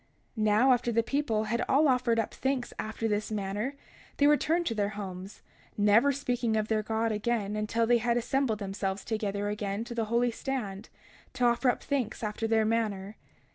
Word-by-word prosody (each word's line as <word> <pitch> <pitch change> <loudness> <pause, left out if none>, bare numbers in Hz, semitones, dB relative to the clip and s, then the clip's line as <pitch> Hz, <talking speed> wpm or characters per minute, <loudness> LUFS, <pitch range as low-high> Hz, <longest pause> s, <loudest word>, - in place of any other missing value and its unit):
31:23 215 - -1
Now, 215 +5 +5
after 240 -1 0
the 230 0 +2
people 235 -5 0
had 235 +2 -1
all 295 +3 +4
offered 250 -3 +2
up 225 - -1
thanks 265 -2 -2
after 220 +1 -3
this 210 -1 -1
manner, 210 +5 -3 0.4
they 285 - +4
returned 315 +4 +3
to 230 - 0
their 205 -2 0
homes, 190 -1 -7 0.3
never 210 +7 +5
speaking 245 -5 -1
of 215 0 -1
their 220 -1 +2
God 220 +1 -1
again 210 -1 -1
until 215 +2 0
they 240 +1 +4
had 235 +1 +1
assembled 245 -1 0
themselves 195 -1 -3
together 205 -2 -2
again 205 0 -3
to 235 +1 -7
the 230 -1 -1
holy 235 +2 +1
stand, 225 -5 -4 0.4
to 250 - 0
offer 240 +2 +3
up - - -1
thanks 260 -6 -2
after 215 +1 -2
their 220 -1 +3
manner. 215 -3 -1
225 Hz, 185 wpm, -29 LUFS, 210-245 Hz, 0.4 s, Now